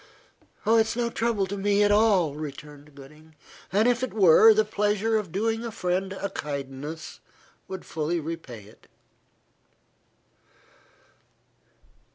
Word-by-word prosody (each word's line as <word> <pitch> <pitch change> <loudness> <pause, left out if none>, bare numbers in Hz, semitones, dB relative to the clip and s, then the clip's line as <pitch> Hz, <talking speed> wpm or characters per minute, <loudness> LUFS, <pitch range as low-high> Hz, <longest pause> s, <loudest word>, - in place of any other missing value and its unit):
"It 220 - +2
is 225 0 +1
no 235 -1 -1
trouble 225 -4 0
to 195 +2 -5
me 200 +1 +2
at 205 - +3
all," 205 -8 +3
returned 150 0 -9
Gooding, 150 +3 -16 0.4
"and 210 +5 +3
if 245 0 +1
it 255 -4 -4
were, 200 +2 +7
the 215 0 +3
pleasure 210 +1 0
of 210 -6 -2
doing 225 +4 -1
a 235 - -5
friend 190 -2 -2
a 200 0 -5
kindness 145 +1 -6 0.5
would 190 -1 -7
fully 160 +2 -2
repay 155 -9 -7
it." 105 - -19
190 Hz, 130 wpm, -26 LUFS, 155-215 Hz, 0.5 s, were